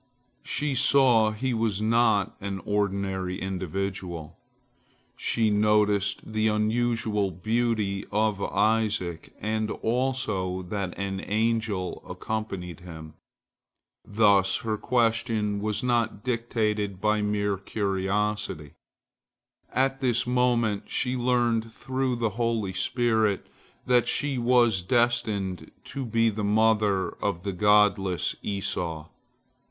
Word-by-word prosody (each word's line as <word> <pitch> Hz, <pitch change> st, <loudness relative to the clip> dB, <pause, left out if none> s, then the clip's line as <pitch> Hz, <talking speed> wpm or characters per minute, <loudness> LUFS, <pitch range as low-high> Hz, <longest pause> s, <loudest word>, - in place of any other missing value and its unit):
She 150 Hz, -1 st, -1 dB
saw 130 Hz, -4 st, +4 dB
he 120 Hz, +4 st, -2 dB
was 110 Hz, -3 st, 0 dB
not 110 Hz, -2 st, +2 dB
an 100 Hz, -1 st, -4 dB
ordinary 100 Hz, -2 st, -1 dB
individual. 95 Hz, -3 st, -4 dB, 0.8 s
She 110 Hz, -2 st, +1 dB
noticed 105 Hz, -1 st, +1 dB
the 110 Hz, 0 st, +2 dB
unusual 110 Hz, -1 st, +1 dB
beauty 110 Hz, +1 st, -1 dB
of 105 Hz, -1 st, +1 dB
Isaac, 105 Hz, -7 st, 0 dB
and 110 Hz, +1 st, -1 dB
also 110 Hz, -7 st, -1 dB
that 95 Hz, 0 st, -4 dB
an 95 Hz, -1 st, -3 dB
angel 110 Hz, -4 st, -1 dB
accompanied 95 Hz, -6 st, -5 dB
him. 80 Hz, -3 st, -10 dB, 0.9 s
Thus 100 Hz, -3 st, +3 dB
her 110 Hz, -1 st, -1 dB
question 115 Hz, -3 st, 0 dB
was 105 Hz, +2 st, -2 dB
not 120 Hz, -4 st, 0 dB
dictated 110 Hz, -5 st, -1 dB
by 105 Hz, +1 st, +1 dB
mere 105 Hz, -1 st, 0 dB
curiosity. 100 Hz, -5 st, -2 dB, 1.0 s
At 135 Hz, +1 st, +1 dB
this 125 Hz, -2 st, +1 dB
moment 120 Hz, -4 st, +1 dB
she 125 Hz, 0 st, 0 dB
learnt 120 Hz, -2 st, +1 dB
through 130 Hz, +1 st, -2 dB
the 115 Hz, -2 st, -1 dB
holy 115 Hz, -3 st, -1 dB
spirit, 110 Hz, -1 st, +1 dB, 0.4 s
that 125 Hz, -1 st, +3 dB
she 140 Hz, -3 st, 0 dB
was 120 Hz, -5 st, +3 dB
destined 110 Hz, -4 st, 0 dB
to 135 Hz, -2 st, -5 dB
be 115 Hz, 0 st, +2 dB
the 105 Hz, 0 st, -4 dB
mother 105 Hz, -2 st, +2 dB
of 90 Hz, -4 st, -1 dB
the 100 Hz, -, -3 dB
godless 100 Hz, -2 st, +3 dB
Esau. 85 Hz, -5 st, -3 dB
105 Hz, 105 wpm, -26 LUFS, 100-115 Hz, 1.0 s, saw